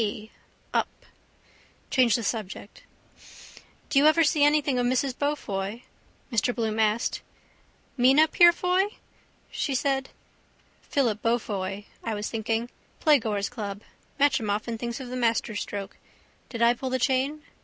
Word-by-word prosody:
p: 215 0 -3 0.4
up. - - +1 1.0
Change 245 -4 +4
the 235 - -2
subject. 210 -1 -5 1.1
—Do 275 - +5
you 295 - +6
ever 330 +2 +5
see 300 -1 +3
anything 290 -3 +3
of 245 - +1
Mrs 255 +1 +1
Beaufoy? 230 -7 -3 0.5
Mr 235 +2 +1
Bloom 225 -2 -1
asked. 215 +1 +1 0.8
—Mina 270 +5 +5
Purefoy? 360 +4 +4 0.6
she 275 - -2
said. 270 0 0 0.7
Philip 235 -7 0
Beaufoy 205 -4 -2 0.2
I 225 -2 -2
was 210 +1 -4
thinking. 225 +1 -2 0.3
Playgoers' 225 - +2
Club. 205 -4 -6 0.4
Matcham 275 -7 +2
often 215 +3 -2
thinks 235 +3 -4
of 260 -2 -7
the 250 - -5
masterstroke. 215 -4 -2 0.5
Did 235 -2 -2
I 235 +1 +6
pull 260 +2 -5
the 260 - 0
chain? 270 +4 0
240 Hz, 130 wpm, -26 LUFS, 215-275 Hz, 1.1 s, you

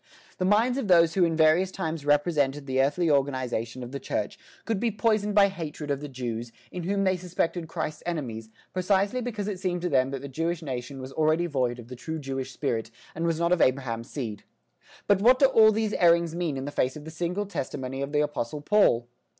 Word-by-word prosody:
The 185 - +1
minds 230 +7 +3
of 230 - -3
those 170 -3 +5
who 185 - +3
in 165 -1 0
various 160 +4 +4
times 160 -6 -4
represented 145 -2 +2
the 130 -1 +1
earthly 145 +6 +1
organisation 130 -4 -1
of 120 - -8
the 140 - -4
Church 200 +8 -3 0.3
could 225 -3 -1
be 235 +2 +1
poisoned 210 -1 +1
by 200 -1 +7
hatred 155 -6 -5
of 140 - -1
the 150 - -5
Jews, 120 -3 -5 0.2
in 180 - -5
whom 195 +1 0
they 190 -1 +2
suspected 175 -1 -2
Christ's 160 -2 -4
enemies, 120 -10 -4 0.2
precisely 195 +6 +1
because 220 -4 -4
it 200 -3 -3
seemed 180 -2 -2
to 180 - 0
them 130 -2 +3
that 135 -1 -5
the - - -5
Jewish 165 +4 -2
nation 135 -1 -5
was 130 +1 -8
already 160 +2 +2
void 130 -6 -1
of 120 -2 -11
the 125 - -8
true 140 +7 -5
Jewish 135 -3 -4
spirit 115 -6 -2 0.2
and 165 +1 -2
was 165 -1 0
not 170 +1 +1
of 180 - +3
Abraham's 125 -3 0
seed. 110 -8 -5 0.6
But 200 -1 +3
what 250 +4 +6
do 270 - +5
all 220 -5 +6
these 215 0 -1
errings 170 -1 +4
mean 170 -5 -2
in 135 - -4
face 130 -2 0
of 150 -1 -9
the 160 - -7
single 175 +5 -2
testimony 135 -7 -4
of 140 +1 -3
the 150 0 +2
apostle 150 -1 -3
Paul? 145 - +3
160 Hz, 215 wpm, -27 LUFS, 135-185 Hz, 0.6 s, by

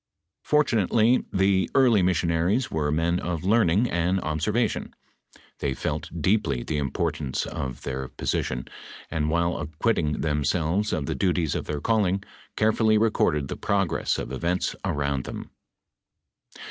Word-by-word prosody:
" 90 - -58
Fortunately 120 -4 +3
the 95 0 +2
early 125 -7 +5
missionaries 90 +5 +1
were 75 -2 0
men 85 +3 +1
of 85 -3 -3
learning 105 +1 +3
and 90 +2 +1
observation. 105 +10 -1 0.6
They 70 -2 -1
felt - - -3
deeply 90 - +1
the 75 - -2
importance 75 0 -2
of 65 -3 -5
their 65 0 -4
]M>sition, 60 -1 -2 0.4
and 75 -1 0
while 85 +1 +1
acquitting 75 +1 -1
themselves 80 +6 0
of 75 - -1
the - - -2
duties 85 -5 0
of - - -3
their 75 -1 -3
calling, 100 -1 +1 0.3
carefully 110 0 +3
recorded 105 -10 +2
the - - -4
progress 100 -4 0
of - - -5
events 85 +2 -1
around 70 -2 -1
them." - - -7
85 Hz, 135 wpm, -25 LUFS, 75-105 Hz, 0.6 s, early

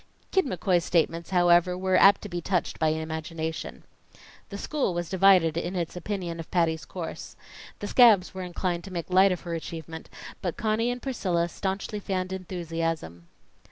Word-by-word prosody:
Kid 380 -6 +2
McCoy's 180 -4 +1
statements, 165 0 0
however, 175 0 +4
were 185 0 +1
apt 195 0 +6
to - - -5
be 175 -3 -4
touched 180 +1 -1
by 160 - +2
imagination. 160 +1 -4 0.7
The 200 - -6
school 265 - -1
was 175 -1 -3
divided 185 -4 +5
in 175 +2 -3
its 170 -2 -3
opinion 180 -2 -4
of 165 - -7
Patty's 165 -3 0
course. 175 -3 -7 0.4
The 205 - -5
scabs 215 -6 +5
were 190 - -6
inclined 175 -1 -3
to 195 - -9
make 175 0 -5
light 190 +1 +6
of 180 - -2
her 170 -2 -5
achievement, 160 0 -7 0.3
but 175 -3 -3
Conny 220 +2 0
and 245 0 -4
Priscilla 185 -10 0
staunchly 195 +4 -3
fanned 185 -2 -3
enthusiasm. 165 - -4
180 Hz, 165 wpm, -27 LUFS, 165-190 Hz, 0.7 s, apt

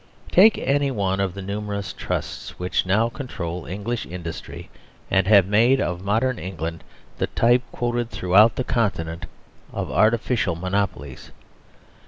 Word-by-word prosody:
Take 215 +5 +6
any 140 +1 +1
one 100 -6 -1
of 95 -2 -1
the 100 - -6
numerous 100 0 -4
Trusts - - -5
which 90 +1 -1
now 110 +5 +3
control 95 - -6
English 105 +5 -4
industry, 85 -2 -8 0.4
and 95 -1 +3
have 100 -3 +6
made 115 +7 +4
of 90 -5 -2
modern 115 +5 0
England 85 -2 -5 0.4
the - - +1
type, 120 +2 +3
quoted 120 -1 -2
throughout 105 +3 +4
the 130 - -1
Continent, 90 -9 -2 0.4
of - - -4
artificial 110 -4 +2
monopolies. 90 -7 -3
100 Hz, 135 wpm, -23 LUFS, 90-120 Hz, 0.4 s, Take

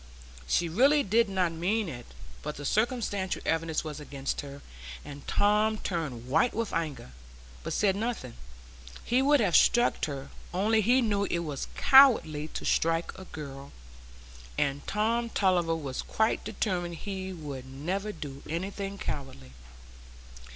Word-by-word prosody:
She 170 - +2
really 275 - +4
did 225 +2 +3
not 185 -3 +1
mean 190 +6 0
it, 120 -6 -7 0.3
but 150 0 -5
the 145 - -7
circumstantial 215 - 0
evidence 165 -1 0
was 155 -2 -6
against 140 -2 -4
her, 140 0 -10 0.4
and 145 -1 -10
Tom 210 +1 +3
turned 150 - -4
white 155 - +2
with 230 -1 -2
anger, 150 - -3 0.5
but - - -5
said 195 -2 +2
nothing; 215 - -3 0.7
he 245 +2 +3
would 285 +1 +4
have 190 -6 +2
struck 240 0 +4
her, 140 -2 -6 0.2
only 220 +4 +3
he 245 +5 +4
knew 205 -3 +1
it 170 -3 -1
was 145 -3 -4
cowardly 220 - +6
to - - -6
strike 165 +1 +1
a 190 - -10
girl, 140 -4 -8 0.9
and 140 0 -1
Tom 230 +3 0
Tulliver 180 -6 +2
was 140 -5 -4
quite 220 0 0
determined 175 -4 -2
he 190 +1 -5
would 145 -7 -7
never 180 +10 -3
do 140 -7 -8
anything 195 +4 -4
cowardly. 135 - -6
175 Hz, 145 wpm, -29 LUFS, 145-215 Hz, 0.9 s, cowardly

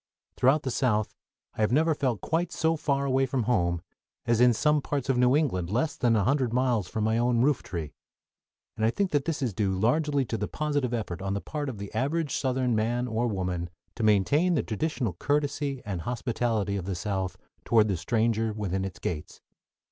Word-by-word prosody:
Throughout 140 +4 +3
the 130 - -2
South 110 -4 +1 0.4
I - - -4
have 105 - +2
never 160 +5 +3
felt 130 - -1
quite 170 +2 -1
so 160 0 +1
far 140 -2 0
away 135 0 +2
from 125 -1 -1
home 85 -7 +1 0.4
as 120 0 +2
in 125 0 +7
some 150 +5 +2
parts 140 -2 -3
of 130 - +2
New 125 +2 +4
England 95 - 0
less 130 - 0
than 120 -2 +2
a 105 - +2
hundred 130 -1 +1
miles 120 -6 +1
from 110 +3 -2
my 110 +1 +2
own 120 0 +2
rooftree, 90 - -1 0.8
and 110 - -3
I 110 - +4
think 195 +10 -1
that 145 -2 +1
this 155 -4 -2
is 120 -5 -1
due 95 0 0
largely 140 +5 +2
to 115 -1 -3
the 105 - -1
positive 145 -4 -1
effort 105 -7 -3
on 95 0 -2
the - - -1
part 145 +5 -4
of 120 - -6
the 100 0 -7
average 145 +5 0
Southern 130 -2 0
man 120 +3 0
or 115 +1 0
woman 90 -4 -2 0.2
to - - -6
maintain 125 - +3
the 145 - +1
traditional 120 - -2
courtesy 145 - -1
and 95 -5 -3
hospitality 115 -3 -1
of 90 - -5
the 95 -1 -2
South 95 0 -3 0.3
toward 110 -2 +4
the 100 - 0
stranger 110 +4 0
within 95 -3 -2
its 95 -1 -5
gates. 75 -3 -5
120 Hz, 200 wpm, -27 LUFS, 105-140 Hz, 0.8 s, in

